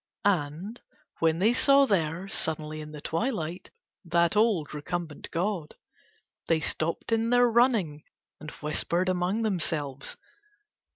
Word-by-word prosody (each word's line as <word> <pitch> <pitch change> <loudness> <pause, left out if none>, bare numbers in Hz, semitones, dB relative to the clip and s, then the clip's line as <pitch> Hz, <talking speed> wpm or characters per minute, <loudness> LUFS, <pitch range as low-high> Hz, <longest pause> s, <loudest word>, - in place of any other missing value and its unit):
And, 185 +4 -1 0.4
when 165 -1 +2
they 215 +7 +3
saw 275 +2 +5
there, 175 - 0
suddenly 155 -4 -1
in 150 0 -9
the 150 -1 -9
twilight, 175 - -3 0.3
that 170 0 +2
old 210 -9 +2
recumbent 155 +1 -5
god, 175 -2 -2 0.7
they 165 - +3
stopped 160 +5 -2
in 225 0 +1
their 245 0 +5
running 225 - +2 0.4
and 155 - -8
whispered 170 +5 0
among 185 +5 0
themselves. 150 -9 -1
170 Hz, 120 wpm, -27 LUFS, 155-215 Hz, 0.7 s, saw